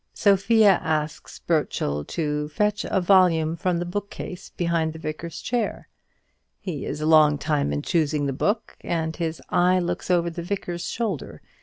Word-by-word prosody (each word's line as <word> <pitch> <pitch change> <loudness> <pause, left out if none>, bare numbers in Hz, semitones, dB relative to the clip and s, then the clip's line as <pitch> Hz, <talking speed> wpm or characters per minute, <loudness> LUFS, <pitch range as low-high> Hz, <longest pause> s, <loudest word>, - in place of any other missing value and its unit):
Sophia 205 0 +4
asks 155 -1 -3
Burchell 75 +1 -1
to 150 - -2
fetch 210 +6 0
a - - +1
volume 175 -4 +4
from 175 +1 0
the 175 - -2
bookcase 190 -1 -6
behind 165 -2 -1
the - - -9
Vicar's 160 +1 -6
chair. 240 -3 -2 0.7
He 175 -9 -5
is 150 - -4
a - - -1
long 155 -2 +6
time 140 - 0
choosing 155 -3 +1
the 135 - -1
book, 210 - -1
and 160 -1 -2
his 165 -2 -3
eye 180 +1 +3
looks 175 0 -2
over 170 -1 +2
the 170 +1 -5
Vicar's 175 -1 -4
shoulder. 190 - -3
170 Hz, 155 wpm, -24 LUFS, 155-185 Hz, 0.7 s, long